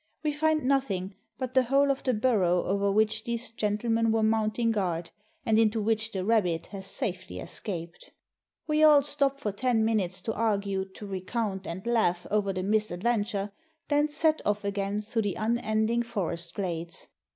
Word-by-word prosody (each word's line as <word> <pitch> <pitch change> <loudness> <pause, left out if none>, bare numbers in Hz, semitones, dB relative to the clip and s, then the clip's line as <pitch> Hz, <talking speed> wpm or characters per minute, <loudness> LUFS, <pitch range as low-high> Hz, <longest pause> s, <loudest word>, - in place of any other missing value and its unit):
We 305 - +1
find 310 +1 +1
nothing 220 -9 0 0.2
but 255 -1 -4
the 260 - +6
hole 275 +3 +3
of 275 - -2
the 255 -3 +1
burrow 200 -7 +2
over 200 +1 +1
which 215 +1 +2
these 235 0 -3
gentlemen 225 +1 +1
were 225 0 +2
mounting 220 +1 +2
guard, 175 -6 -2 0.3
and 220 0 +3
into 225 0 +3
which 220 +1 0
the 190 -1 -3
rabbit 180 -7 +2
has 195 -1 -6
safely 185 -1 -3
escaped. 170 -5 -6 0.6
We 305 0 +1
all 300 -2 +7
stop 280 -1 0
for 210 -7 -2
ten 225 +1 +1
minutes 195 -5 0
to 225 - -2
argue, 200 -3 0
to 190 +2 -11
recount, 195 +1 -3
and 185 +5 -6
laugh 220 -7 +1
over 205 -2 +2
the 185 -1 -3
misadventure, 210 +1 0 0.4
then 295 0 +3
set 310 +1 +1
off 205 0 0
again 200 +1 -1
through 225 +2 -1
the 205 -2 -1
unending 220 0 +1
forest 180 -7 -3
glades. 170 -3 -3
215 Hz, 165 wpm, -28 LUFS, 195-235 Hz, 0.6 s, all